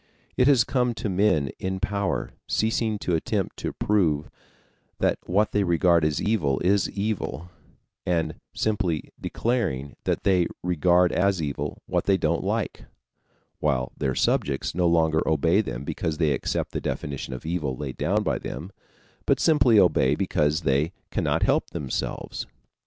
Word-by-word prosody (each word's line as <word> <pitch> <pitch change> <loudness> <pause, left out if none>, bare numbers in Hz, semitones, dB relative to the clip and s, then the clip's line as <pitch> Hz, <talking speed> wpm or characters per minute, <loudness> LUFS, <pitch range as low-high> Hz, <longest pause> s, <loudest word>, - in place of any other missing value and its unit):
It 125 - +3
has 135 -4 +6
come 125 -2 0
to 110 -1 -3
men 90 -8 +2
in 95 0 -3
power 100 0 -1 0.2
ceasing 110 0 0
to 90 - -2
attempt 80 - -1
to - - -3
prove 80 -8 +1 0.7
that - - +1
what 100 +4 +2
they 105 - +2
regard 85 -2 +3
as 75 0 +1
evil 80 -12 +1
is 95 +1 +2
evil, 95 - -3 0.5
and 80 -3 0 0.2
simply 100 -7 -1
declaring 95 - -1
that - - 0
they 90 -3 +3 0.2
regard 90 +1 +3
as 95 0 +2
evil 70 -3 -4
what - - -1
they 100 -1 +3
don't 85 -1 0
like, - - -2 0.7
while 65 -5 0
their 65 -2 -1
subjects 70 -1 0
no 90 0 +2
longer 80 -2 +3
obey 80 +6 +3
them 65 - -5
because 75 +2 -3
they 80 -3 +2
accept 70 - -2
the - - -3
definition 70 -2 -4
of 65 - -9
evil 75 -6 -2
laid 70 -3 -5
down - - +1
by - - 0
them, 80 +9 -6 0.6
but - - +3
simply 130 -8 +4
obey 75 -7 +4
because 75 -3 +1
they 75 +3 +1 0.2
cannot - - 0
help - - +2
themselves. 70 -3 -4
85 Hz, 150 wpm, -25 LUFS, 75-100 Hz, 0.7 s, has